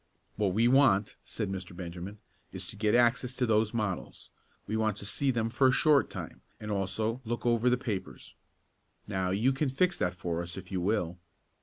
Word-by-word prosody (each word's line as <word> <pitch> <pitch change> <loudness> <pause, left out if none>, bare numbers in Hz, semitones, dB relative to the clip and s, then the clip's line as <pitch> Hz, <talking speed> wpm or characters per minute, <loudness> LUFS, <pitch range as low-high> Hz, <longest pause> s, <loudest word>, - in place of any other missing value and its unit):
"What 100 -3 0
we 115 +2 +4
want," 120 -6 +4
said 105 -4 -4
Mr. 95 -2 -6
Benjamin, 90 +3 -7 0.3
"is - - -5
to - - -7
get 105 +1 +2
access 120 +1 +3
to 130 - +1
those 110 -1 +2
models. 105 -5 -4 0.3
We 110 - -3
want 110 -2 +1
to 100 - -8
see 135 +7 -1
them 115 -3 0
for 130 +2 +4
a - - +5
short 145 +3 +4
time, - - -7 0.2
and 105 0 -5
also 105 +5 -1
look 120 0 -4
over 120 +1 +3
the 125 - +3
papers. 95 - -5 0.7
Now 95 -2 -1
you 110 +8 +2
can 135 +1 0
fix 175 +7 +1
that 90 0 0
for 85 -1 -2
us 85 +1 -7
if 95 0 -9
you 95 -2 -1
will." 90 -3 0
110 Hz, 195 wpm, -30 LUFS, 95-120 Hz, 0.7 s, a